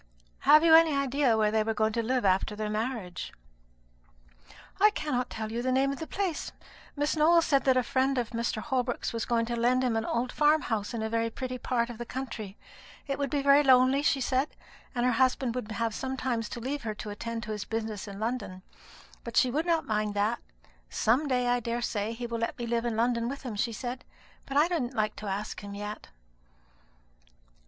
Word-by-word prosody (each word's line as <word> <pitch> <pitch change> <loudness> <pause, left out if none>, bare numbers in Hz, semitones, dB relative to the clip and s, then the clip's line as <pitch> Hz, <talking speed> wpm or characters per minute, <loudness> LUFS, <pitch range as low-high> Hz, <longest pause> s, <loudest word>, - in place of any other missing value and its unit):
"Have 305 +1 +8
you 330 -1 +6
any 320 -2 +7
idea 275 -3 +2
where 215 -1 +2
they 220 0 +2
were 220 +1 -1
going 220 0 +1
to 230 - 0
live 250 0 0
after 190 +2 +2
their 210 0 -3
marriage?" 215 -5 -3 1.5
"I 420 +2 +7
cannot 290 - -2
tell 220 0 -5
you 235 +1 -2
the 255 +1 0
name 270 +1 +2
of 275 - -5
the 320 - -5
place. 380 -6 -2 0.4
Miss 290 +2 0
Nowell 330 +2 +5
said 275 -3 +2
that 260 -1 +4
a 255 - +3
friend 265 +2 +1
of 240 -2 -1
Mr. 230 -2 -2
Holbrook's 250 -3 -1
was 230 -1 -2
going 230 -1 +1
to 235 +1 -3
lend 245 +2 +2
him 245 -3 +1
an 225 - 0
old 245 +1 -1
farm 300 +1 +3
house 220 0 -2
in 220 - -2
a - - 0
very 230 0 0
pretty 255 +2 -5
part 240 -2 -1
of 235 - -11
the 240 - -4
country. 225 -6 -6 0.5
It 275 0 -3
would 280 -1 -1
be 280 0 -1
very 280 +1 +6
lonely, 260 0 +5
she 285 -2 +2
said, 260 +3 0 0.5
and 240 0 +1
her 250 - +4
husband 255 0 +2
would 235 -3 -5
have 225 +2 -1
sometimes 255 -3 -2
to - - -6
leave 275 +4 -3
her 220 -2 -4
to 210 -1 -6
attend 230 +2 -5
to 220 - -5
his 210 -1 -3
business 220 -2 -4
in 200 0 -8
London; 215 -5 -3 0.6
but 235 -1 -5
she 255 - +4
would 310 +6 -1
not 330 -2 +2
mind 210 -1 -1
that. 210 +4 +1 0.5
'Some 255 +7 +2
day, 250 -2 +1
I 245 0 +2
daresay, 230 -2 -2
he 240 +1 -5
will 235 -1 -3
let 230 - -2
me 240 - -4
live 235 0 -1
in 230 -2 -1
London 235 0 +1
with 275 +1 -6
him,' 240 -5 -5
she 230 +3 0
said; 245 +3 -5 0.4
'but 275 - -2
I 300 +3 +5
don't 270 -8 -2
like 215 -1 0
to 210 - -6
ask 205 +2 -4
him 200 0 -7
that - - -7
yet.'" 210 +1 -6
240 Hz, 220 wpm, -29 LUFS, 220-265 Hz, 1.5 s, Have